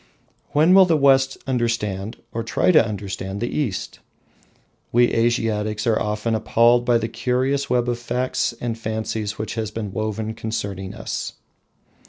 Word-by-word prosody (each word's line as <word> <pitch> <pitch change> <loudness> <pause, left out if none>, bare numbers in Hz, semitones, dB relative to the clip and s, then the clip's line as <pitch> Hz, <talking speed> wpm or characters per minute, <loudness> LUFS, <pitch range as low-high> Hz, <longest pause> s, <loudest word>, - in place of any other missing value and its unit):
When 155 +5 +5
will 190 0 +8
the 165 -3 +3
West 135 -1 +4
understand, 115 -5 -1 0.2
or 115 - -2
try 115 - +2
to 155 - +6
understand, 100 -2 -5
the 120 +2 -3
East? 120 -11 -3 0.9
We 120 +1 +4
Asiatics 110 -2 0
are 115 -2 +2
often 105 +2 -1
appalled 115 +2 +3
by 120 -1 +4
the 110 -1 -2
curious 125 +4 -1
web 125 -1 +1
of 120 -1 -1
facts 125 +2 -1
and 120 -2 -2
fancies 110 -1 -3
which 110 - -4
has 110 -2 -3
been 105 -2 -5
woven 110 +1 -3
concerning 105 -3 -4
us. 110 - -4
115 Hz, 150 wpm, -22 LUFS, 110-120 Hz, 0.9 s, will